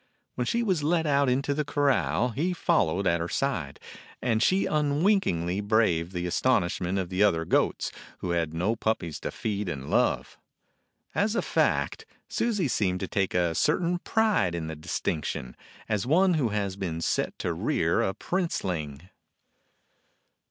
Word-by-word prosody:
When 125 Hz, -1 st, -2 dB
she 235 Hz, 0 st, +1 dB
was 185 Hz, -8 st, +1 dB
let 165 Hz, +2 st, +1 dB
out 140 Hz, -2 st, +3 dB
into 135 Hz, +3 st, +1 dB
the 150 Hz, +1 st, -1 dB
corral 145 Hz, -3 st, +1 dB
he 155 Hz, +10 st, -1 dB
followed 100 Hz, -, +1 dB
at 85 Hz, -1 st, +2 dB
her 85 Hz, +1 st, -3 dB
side, 90 Hz, -, -2 dB, 0.4 s
and 115 Hz, -3 st, 0 dB
she 190 Hz, +10 st, +3 dB
unwinkingly 145 Hz, -, +1 dB
braved 100 Hz, -6 st, +2 dB
the 90 Hz, -1 st, -2 dB
astonishment 90 Hz, -2 st, +1 dB
of 95 Hz, -2 st, -2 dB
the 95 Hz, +1 st, -1 dB
other 85 Hz, -6 st, +3 dB
goats, -, -, +1 dB, 0.3 s
who 90 Hz, -, -3 dB
had 85 Hz, -2 st, 0 dB
no 90 Hz, +8 st, 0 dB
puppies 110 Hz, -8 st, -2 dB
to -, -, -4 dB
feed 105 Hz, -3 st, -3 dB
and 70 Hz, -4 st, -5 dB
love. -, -, +1 dB, 0.7 s
As 210 Hz, +2 st, +1 dB
a -, -, +1 dB
fact, 445 Hz, -, 0 dB, 0.2 s
Susie 210 Hz, -9 st, 0 dB
seemed 95 Hz, -7 st, 0 dB
to 95 Hz, -, -2 dB
take 95 Hz, -2 st, -1 dB
a 85 Hz, -2 st, +2 dB
certain 175 Hz, -, +1 dB
pride 205 Hz, -, +1 dB
in 85 Hz, -2 st, -3 dB
the 80 Hz, 0 st, -5 dB
distinction, 75 Hz, -4 st, -3 dB, 0.3 s
as 105 Hz, +1 st, -1 dB
one 180 Hz, +6 st, +4 dB
who 140 Hz, -8 st, +1 dB
has 100 Hz, -2 st, -2 dB
been 90 Hz, -5 st, -3 dB
set -, -, -1 dB
to -, -, -2 dB
rear -, -, +1 dB
a 95 Hz, -, -1 dB
princeling. 85 Hz, -, -2 dB
105 Hz, 160 wpm, -27 LUFS, -, 0.7 s, one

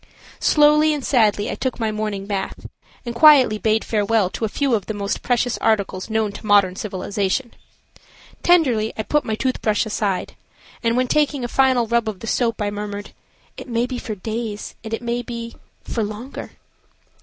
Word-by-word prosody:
Slowly 300 Hz, +1 st, +4 dB
and 285 Hz, -, -5 dB
sadly 215 Hz, -5 st, +2 dB
I -, -, -2 dB
took 260 Hz, -1 st, -3 dB
my 220 Hz, -1 st, 0 dB
morning 210 Hz, -2 st, -3 dB
bath 195 Hz, -1 st, -4 dB, 0.4 s
and 235 Hz, -, -4 dB
quietly 255 Hz, -4 st, +6 dB
bade 220 Hz, 0 st, +1 dB
farewell 210 Hz, -2 st, +1 dB
to 225 Hz, -, -2 dB
a -, -, -2 dB
few 275 Hz, +3 st, 0 dB
of 205 Hz, -5 st, 0 dB
the 220 Hz, -, -3 dB
most 200 Hz, -1 st, -2 dB
precious 245 Hz, -1 st, 0 dB
articles 200 Hz, -2 st, 0 dB
known 220 Hz, -1 st, 0 dB
to 200 Hz, -, -10 dB
modern 200 Hz, -3 st, +4 dB
civilization. 200 Hz, +4 st, -2 dB, 0.9 s
Tenderly 255 Hz, -11 st, +3 dB
I 220 Hz, -, -1 dB
put 295 Hz, +5 st, 0 dB
my 220 Hz, -, -1 dB
tooth 255 Hz, +3 st, -2 dB
brush 215 Hz, +1 st, +1 dB
aside, 205 Hz, -3 st, -2 dB, 0.5 s
and, 230 Hz, 0 st, +1 dB
when 255 Hz, 0 st, +2 dB
taking 290 Hz, -1 st, +1 dB
a -, -, -1 dB
final 260 Hz, -1 st, +3 dB
rub 235 Hz, 0 st, +1 dB
of 200 Hz, -4 st, -7 dB
the -, -, -6 dB
soap, 230 Hz, 0 st, 0 dB
I 205 Hz, -, -1 dB
murmured, 205 Hz, 0 st, -6 dB, 0.5 s
"It -, -, -8 dB
may 235 Hz, 0 st, +1 dB
be 250 Hz, -1 st, -5 dB
for 215 Hz, -, -5 dB
days, 215 Hz, +1 st, -5 dB
and 220 Hz, -, -7 dB
it 225 Hz, +1 st, -3 dB
may 240 Hz, +1 st, -1 dB
be–for 235 Hz, -1 st, -7 dB
longer." 215 Hz, +6 st, -7 dB
225 Hz, 180 wpm, -21 LUFS, 210-245 Hz, 0.9 s, quietly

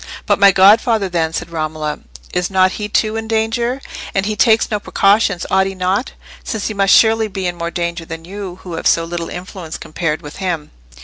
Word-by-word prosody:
"But -, -, +2 dB
my 200 Hz, -1 st, +7 dB
godfather, 205 Hz, +2 st, +5 dB
then," 165 Hz, -2 st, 0 dB
said 165 Hz, +1 st, -5 dB
Romola; 155 Hz, -2 st, -3 dB, 0.3 s
"is 180 Hz, 0 st, 0 dB
not 185 Hz, -1 st, +3 dB
he, 210 Hz, +1 st, -5 dB
too, 215 Hz, +1 st, +1 dB
in 225 Hz, 0 st, -4 dB
danger? 230 Hz, +3 st, 0 dB, 0.4 s
And 195 Hz, 0 st, +1 dB
he 215 Hz, +1 st, -1 dB
takes 225 Hz, +2 st, +3 dB
no 210 Hz, -, 0 dB
precautions—ought 195 Hz, -2 st, +2 dB
he 195 Hz, -, -5 dB
not? 185 Hz, +6 st, -1 dB, 0.3 s
since 215 Hz, -2 st, -4 dB
he -, -, -3 dB
must 195 Hz, -1 st, +4 dB
surely 225 Hz, 0 st, +4 dB
be 190 Hz, -2 st, -5 dB
in 175 Hz, -1 st, -1 dB
more 170 Hz, 0 st, -3 dB
danger 170 Hz, -1 st, -3 dB
than 165 Hz, 0 st, -8 dB
you, 190 Hz, -1 st, -7 dB
who 180 Hz, -, -7 dB
have 165 Hz, -, -1 dB
so 165 Hz, -, +3 dB
little 170 Hz, 0 st, -4 dB
influence 180 Hz, -2 st, -7 dB
compared 160 Hz, 0 st, -3 dB
with 145 Hz, -, -9 dB
him." 175 Hz, -6 st, -3 dB
190 Hz, 200 wpm, -17 LUFS, 170-210 Hz, 0.4 s, my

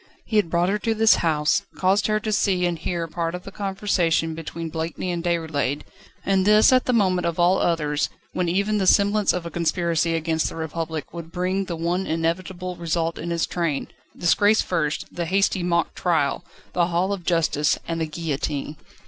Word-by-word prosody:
He 220 Hz, -, 0 dB
had 205 Hz, -6 st, +2 dB
brought 175 Hz, +2 st, +2 dB
her 210 Hz, +2 st, 0 dB
to 225 Hz, +1 st, 0 dB
this 220 Hz, 0 st, +5 dB
house, 155 Hz, 0 st, +2 dB
caused 190 Hz, +2 st, +2 dB
her 215 Hz, 0 st, +1 dB
to 215 Hz, -, -2 dB
see 190 Hz, -3 st, +2 dB
and 175 Hz, -2 st, -1 dB
hear 170 Hz, +1 st, -2 dB
part 165 Hz, +1 st, -3 dB
of 180 Hz, -, -7 dB
the 195 Hz, -, -9 dB
conversation 190 Hz, -5 st, 0 dB
between 165 Hz, +1 st, -6 dB
Blakeney 165 Hz, +3 st, -3 dB
and 170 Hz, -1 st, -3 dB
Déroulède, 160 Hz, -5 st, -1 dB, 0.4 s
and 195 Hz, -1 st, +2 dB
this 210 Hz, +5 st, +6 dB
at 255 Hz, -, +3 dB
the -, -, +1 dB
moment 185 Hz, -6 st, +2 dB
of 170 Hz, -, -2 dB
all 180 Hz, +2 st, +4 dB
others, 150 Hz, -4 st, 0 dB, 0.2 s
when 180 Hz, -2 st, 0 dB
even 200 Hz, +4 st, +1 dB
the 190 Hz, -, 0 dB
semblance 205 Hz, +1 st, +4 dB
of 180 Hz, -1 st, -3 dB
a 170 Hz, -, -5 dB
conspiracy 170 Hz, -1 st, 0 dB
against 160 Hz, 0 st, 0 dB
the -, -, -9 dB
Republic 160 Hz, -1 st, -4 dB
would 170 Hz, -1 st, -8 dB
bring 185 Hz, +2 st, -1 dB
the 175 Hz, -, -4 dB
one 175 Hz, +3 st, -1 dB
inevitable 175 Hz, +3 st, -2 dB
result 165 Hz, -1 st, -1 dB
in 170 Hz, +1 st, -4 dB
its 170 Hz, -1 st, +1 dB
train: 165 Hz, -5 st, -2 dB, 0.3 s
disgrace 205 Hz, +5 st, +3 dB
first, 155 Hz, -4 st, -1 dB
the 175 Hz, -, -3 dB
hasty 195 Hz, +1 st, +2 dB
mock 170 Hz, -1 st, 0 dB
trial, 165 Hz, -3 st, 0 dB, 0.3 s
the 175 Hz, -1 st, +2 dB
hall 180 Hz, +3 st, 0 dB
of 190 Hz, -3 st, -5 dB
justice, 160 Hz, -4 st, +1 dB
and 165 Hz, 0 st, -2 dB
the 160 Hz, -, 0 dB
guillotine. 150 Hz, -2 st, -3 dB
170 Hz, 190 wpm, -23 LUFS, 165-190 Hz, 0.4 s, this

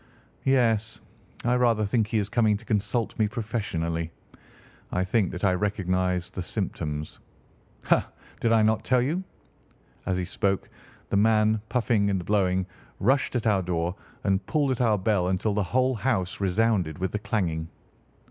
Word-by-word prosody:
"Yes; 115 Hz, -5 st, +2 dB, 0.5 s
I 120 Hz, -, +3 dB
rather 115 Hz, -3 st, +3 dB
think 110 Hz, +1 st, +1 dB
he 110 Hz, 0 st, -1 dB
is 100 Hz, -2 st, 0 dB
coming 110 Hz, -2 st, +2 dB
to 115 Hz, -, -16 dB
consult 115 Hz, +2 st, -1 dB
me 110 Hz, -, +4 dB
professionally. 100 Hz, -8 st, -2 dB, 0.8 s
I 90 Hz, -, +1 dB
think 95 Hz, +1 st, +1 dB
that 90 Hz, -, -7 dB
I 95 Hz, -2 st, +4 dB
recognise 90 Hz, -2 st, 0 dB
the 95 Hz, -, -5 dB
symptoms. 80 Hz, -6 st, -4 dB, 0.6 s
Ha! -, -, +2 dB, 0.3 s
did 115 Hz, -, +1 dB
I 110 Hz, -1 st, +5 dB
not 110 Hz, 0 st, +2 dB
tell 130 Hz, -1 st, +3 dB
you?" 165 Hz, +8 st, -1 dB, 0.8 s
As 95 Hz, -, +1 dB
he 90 Hz, -, -1 dB
spoke, 95 Hz, +1 st, -1 dB, 0.4 s
the -, -, +3 dB
man, 110 Hz, 0 st, +3 dB
puffing 110 Hz, -4 st, +2 dB
and 95 Hz, -3 st, -1 dB
blowing, 95 Hz, -3 st, +2 dB, 0.3 s
rushed 130 Hz, +5 st, +2 dB
at 120 Hz, -, -1 dB
our 105 Hz, -3 st, +3 dB
door 85 Hz, -1 st, -1 dB, 0.3 s
and 95 Hz, -1 st, +1 dB
pulled 145 Hz, -3 st, +1 dB
at 130 Hz, -, -1 dB
our 110 Hz, -3 st, +3 dB
bell 95 Hz, -2 st, +1 dB
until 95 Hz, +3 st, 0 dB
the 105 Hz, -, +1 dB
whole 130 Hz, +7 st, +1 dB
house 110 Hz, -6 st, -1 dB
resounded 95 Hz, -4 st, +1 dB
with 95 Hz, 0 st, -2 dB
the 105 Hz, -, -2 dB
clanging. 85 Hz, -7 st, -1 dB
105 Hz, 160 wpm, -26 LUFS, 90-115 Hz, 0.8 s, I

